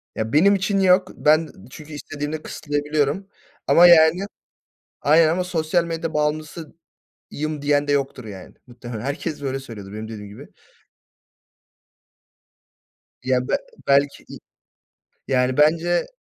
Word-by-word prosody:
Ya 110 +1 -4
benim 195 +7 +5
için 195 +1 0
yok 185 0 +4
ben 155 +1 +2 0.2
çünkü 155 +3 -11
istediğimde 145 +1 -5
kısıtlayabiliyorum, 150 +4 -2 0.4
ama 175 +1 +7
yani 170 +2 +5 0.8
Aynen 155 +2 +5
ama 180 +3 0
"Sosyal 170 -1 0
medya 165 -1 -4
bağımlısıyım." 155 +2 -4 0.7
diyen 145 0 +1
de - - +2
yoktur 135 -3 -2
yani. 95 -4 -10
Muhtemelen 120 -2 -9
herkes 145 +3 -4
böyle 135 0 -3
söylüyordur 105 -6 -10
benim 110 +1 -7
dediğim 105 -2 -8
gibi. 135 - -12 2.8
Ya 125 0 0
be - - +1 0.3
belki 140 +1 +2
i - - -10 0.9
yani 125 -1 +1
bence 165 +4 +2
150 Hz, 120 wpm, -22 LUFS, 130-165 Hz, 2.8 s, ama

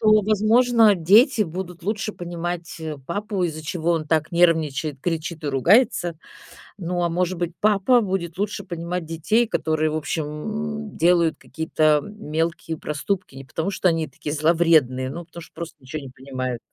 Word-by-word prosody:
то, 215 -1 +5
возможно, 220 +1 +4
дети 215 - +5
будут 180 -1 -6
лучше 215 +1 -2
понимать, 175 -1 -5
э, 155 -2 -4
папу, 200 +2 -2
из-за 155 -2 -3
чего 170 +2 -1
он 160 -2 -1
так 155 -1 +1
нервничает, 160 -4 +2
кричит 165 -1 -3
и - - -1
ругается. 175 - +3 0.6
Ну, 175 -1 -2
а 170 - +1
может 180 +1 -1
быть, 175 -1 -2
папа 215 +4 +4
будет 185 -4 -3
лучше 205 0 -2
понимать 175 -1 -4
детей, 165 +9 +1
которые, 155 -5 0
в - - -2
общем, 155 +1 -2
м, 220 +8 -5
делают 170 -2 +3
какие-то 155 -2 +1
мелкие 165 -4 -3
проступки, 150 +2 -3
не 135 - -8
потому, 160 +8 -3
что 185 - +2
они 165 -2 0
такие 145 +2 -6
зловредные, 155 -5 +3
но 170 +4 -7
потому, 170 +1 -11
что - - -14
просто 170 -1 -7
ничего 130 +4 -6
не 135 - -8
понимают. 130 -2 -5
170 Hz, 165 wpm, -23 LUFS, 155-200 Hz, 0.6 s, то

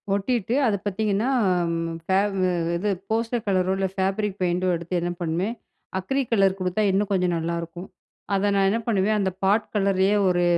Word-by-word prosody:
ஒட்டிட்டு, 220 +2 0
அத 210 - +2
பார்த்தீங்கன்னா 205 +2 0 0.4
அம் 165 0 -1 0.2
ஃபே 190 - +1 0.6
இது 205 +4 -1 0.2
போஸ்டர் 230 +1 -1
கலரோ, 185 -1 +2
இல்ல 195 0 0
ஃபேப்ரிக் 195 +1 -1
பெயிண்ட் 180 0 0
டோ 185 - +2
எடுத்து 170 +2 -6
என்ன 175 +1 -1
பண்ணுவேன், 175 +6 -1 0.5
அக்ரி 270 +9 -1
கலர் 195 -3 +3
குடுத்தா 185 +3 0
இன்னும் 200 +1 0
கொஞ்சம் 180 -2 +1
நல்லாயிருக்கும் 170 +2 -4 0.5
அத 200 +1 +1
நான் 195 -1 +3
என்ன 220 +4 +1
பண்ணுவேன், 210 -1 +2
அந்த 190 -2 0
பாட் 205 +3 +3
கலரயே 195 0 +2
ஒரு, 175 -1 +2
195 Hz, 165 wpm, -24 LUFS, 180-210 Hz, 0.6 s, கலர்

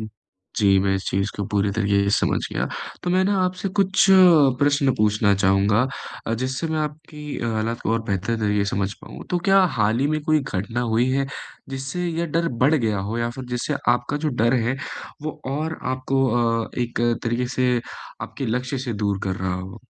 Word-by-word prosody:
जी, 100 -1 -1
मैं 95 0 +1
इस 95 - -2
चीज़ 100 +2 0
को 100 - -2
पूरी 100 -1 +1
तरीके 100 -1 +2
से 100 - +1
समझ - - +1
गया - - -1 0.4
तो 175 - -1
मैं 185 +1 +3
ना 200 +1 +2
आपसे 185 +2 -2
कुछ 195 0 +4 0.6
प्रश्न 145 -2 +3
पूछना 105 -3 +2
चाहूँगा 100 +4 +3 0.4
अ, 115 - 0
जिससे 130 +6 -2
मैं 160 0 -1
आपकी 150 0 -6 0.2
हालात 115 +1 -1
को 110 - -1
और 115 - 0
बेहतर 105 +2 -1
तरीके 105 -2 +1
से 100 - -2
समझ 100 0 -1
पाऊँ - - -10
तो 180 - +1
क्या 195 0 +6 0.2
हाल 110 +2 +2
ही 140 - +2
में 155 - -1
कोई 155 -1 +3
घटना 115 -1 -3
हुई 120 +3 +3
है 135 +1 +1 0.4
जिससे 135 +7 -4
यह 170 0 -1
डर 165 +2 0 0.2
बढ़ 145 +4 +5
गया 110 -8 +1
हो? 105 +4 -3
या 115 0 -1
फिर 130 +2 -8
जिससे 125 -1 -1
आपका 120 +4 +1
जो 155 +1 -1
डर 120 -2 +2
है 130 +3 0 0.5
वो 155 0 -5
और 155 +3 -3
आपको 135 +1 0 0.4
अ, - - -12
एक 120 -1 -2 0.2
तरीके 120 +2 -1
से 125 -1 +2 0.4
आपके 135 -3 -5
लक्ष्य 125 +4 -2
से 125 -2 -3
दूर 100 -1 0
कर 95 -1 -2
रहा 95 -1 -2
हो? 95 +4 -7
120 Hz, 200 wpm, -23 LUFS, 105-145 Hz, 0.6 s, क्या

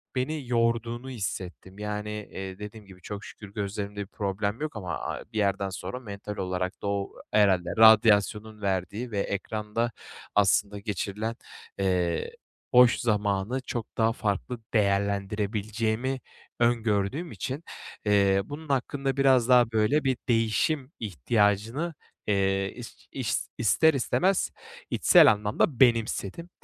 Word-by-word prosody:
beni 135 +1 -2
yorduğunu 115 +1 0
hissettim. 95 -4 -6
Yani, 105 0 -3 0.2
eee, 95 0 -6
dediğim 105 +1 -9
gibi 95 -2 -15
çok 105 +3 -7
şükür 100 -2 -11
gözlerimde 100 0 -4
bir 100 - -6
problem 100 +3 -3
yok 155 -3 -3
ama 95 -5 -4
a - - -4
bir 110 - -4
yerden 100 -1 +1
sonra 125 +6 -6
mental 105 -3 -7
olarak 90 0 -3
da 100 - -3
o 100 -1 -1 0.2
herhâlde 95 -4 +3
radyasyonun 110 -1 +5
verdiği 100 +5 -2
ve 105 - -1
ekranda 105 +3 -2 0.4
aslında 105 0 +3
geçirilen, 105 +2 -3 0.4
eee, 90 -3 0 0.4
boş 125 -1 +7
zamanı 105 +2 0
çok 120 -3 -6
daha 115 0 +3
farklı 110 +3 -2
değerlendirebileceğimi 105 +4 0 0.4
öngördüğüm 120 - +1
için, 140 +4 -5 0.4
eee, 100 -2 +4
bunun 150 +1 -8
hakkında 135 0 -1
biraz 130 -3 +4
daha, 120 -2 +6
böyle, 110 +7 +2
bir 130 -3 +1
değişim 120 +5 +1
ihtiyacını, 105 - 0 0.3
eee, 95 -1 +1
is - - -11
iş - - -2 0.2
ister 160 +8 +4
istemez 180 +8 +1 0.4
içsel - - +7
anlamda 105 +5 0
benimsedim. 115 - +2
105 Hz, 125 wpm, -27 LUFS, 100-120 Hz, 0.4 s, boş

